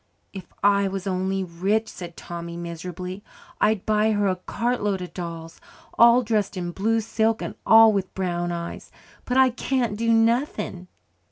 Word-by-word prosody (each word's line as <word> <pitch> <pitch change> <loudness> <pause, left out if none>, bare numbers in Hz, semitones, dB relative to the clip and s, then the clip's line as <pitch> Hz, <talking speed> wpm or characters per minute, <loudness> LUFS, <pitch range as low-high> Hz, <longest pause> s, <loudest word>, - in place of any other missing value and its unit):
"If 190 -3 -9
I 200 0 +4
was 195 -1 -4
only 190 0 -1
rich," 190 +6 -1
said 170 -2 -9
Tommy 170 0 -7
miserably, 180 +3 -6 0.4
"I'd 215 -3 +2
buy 215 0 +2
her 205 -1 +1
a 185 - +1
cartload 210 +1 -2
of 180 -1 -8
dolls, 165 -2 -7 0.3
all 235 +2 +6
dressed 210 -3 -1
in 175 -1 -3
blue 225 +5 0
silk 220 +1 0
and - - -5
all 225 -1 +8
with 195 -2 -2
brown 175 -2 -2
eyes. 170 0 -6 0.4
But 250 - -1
I 260 -1 +5
can't 245 -3 -1
do 230 +2 0
nothing." 225 -5 +1
195 Hz, 160 wpm, -24 LUFS, 180-225 Hz, 0.4 s, all